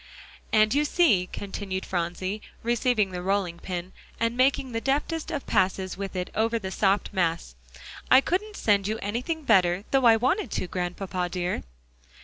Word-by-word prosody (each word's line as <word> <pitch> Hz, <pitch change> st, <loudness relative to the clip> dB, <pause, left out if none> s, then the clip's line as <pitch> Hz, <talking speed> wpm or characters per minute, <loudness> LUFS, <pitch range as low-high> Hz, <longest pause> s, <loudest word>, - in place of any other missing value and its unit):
"And 215 Hz, +1 st, +4 dB
you 290 Hz, +2 st, +3 dB
see," 260 Hz, -, +3 dB
continued 195 Hz, -1 st, -5 dB
Phronsie, 185 Hz, +3 st, -3 dB, 0.2 s
receiving 235 Hz, -3 st, +1 dB
the 180 Hz, -1 st, -4 dB
rolling 185 Hz, -2 st, -1 dB
pin, 180 Hz, 0 st, -5 dB, 0.3 s
and 230 Hz, +1 st, 0 dB
making 260 Hz, 0 st, +2 dB
the 230 Hz, -1 st, -2 dB
deftest 295 Hz, +5 st, -1 dB
of 285 Hz, -, -4 dB
passes 185 Hz, 0 st, 0 dB
with 195 Hz, 0 st, -6 dB
it 180 Hz, 0 st, -3 dB
over 225 Hz, +2 st, +1 dB
the 190 Hz, -4 st, -5 dB
soft 200 Hz, +1 st, +1 dB
mass, 170 Hz, -, -1 dB, 0.6 s
"I 260 Hz, -, +8 dB
couldn't 410 Hz, +8 st, -2 dB
send 200 Hz, -2 st, +2 dB
you 215 Hz, +1 st, -1 dB
anything 250 Hz, -, -3 dB
better, 185 Hz, -6 st, +3 dB
though 270 Hz, -2 st, +3 dB
I 230 Hz, -1 st, +8 dB
wanted 260 Hz, -, 0 dB
to, -, -, -1 dB
Grandpapa 180 Hz, 0 st, -3 dB
dear." 180 Hz, 0 st, -2 dB
205 Hz, 160 wpm, -26 LUFS, 185-245 Hz, 0.6 s, I